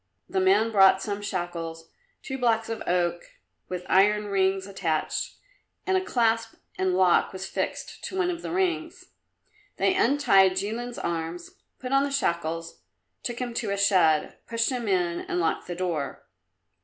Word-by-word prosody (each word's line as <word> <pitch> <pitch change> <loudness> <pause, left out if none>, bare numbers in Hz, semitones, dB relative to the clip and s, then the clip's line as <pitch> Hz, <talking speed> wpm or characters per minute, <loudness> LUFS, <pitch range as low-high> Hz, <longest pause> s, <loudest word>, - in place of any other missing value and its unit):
The 190 - -1
man 200 +4 +3
brought 190 -2 +6
some 205 +1 -4
shackles, 170 -4 -5 0.3
two 265 -2 -5
blocks 225 -2 +1
of 225 -1 -4
oak 175 -1 +1 0.5
with 180 -1 -5
iron 210 +2 +4
rings 190 -1 +1
attached, 180 -6 -2 0.5
and 380 - +1
a 375 - +2
clasp 225 -6 +1 0.2
and 185 -1 0
lock 185 -2 +4
was 190 0 -6
fixed - - -4
to 380 - -5
one 360 -1 +1
of 340 -1 -6
the - - -5
rings. 345 -2 -2 0.7
They - - +3
untied 270 - +4
Jilin's 225 +6 -3
arms, 170 +1 -4 0.3
put 255 0 -6
on 275 0 +4
the 285 - 0
shackles, 165 - -2 0.4
took 240 - -4
him 245 -1 -3
to 230 -2 -2
a 200 - -1
shed, 185 -6 +3
pushed 230 +2 0
him 245 -3 -3
in 175 -3 +1
and 180 - -3
locked 165 - -1
the 175 - -4
door. 170 -6 -3
195 Hz, 160 wpm, -26 LUFS, 175-235 Hz, 0.7 s, brought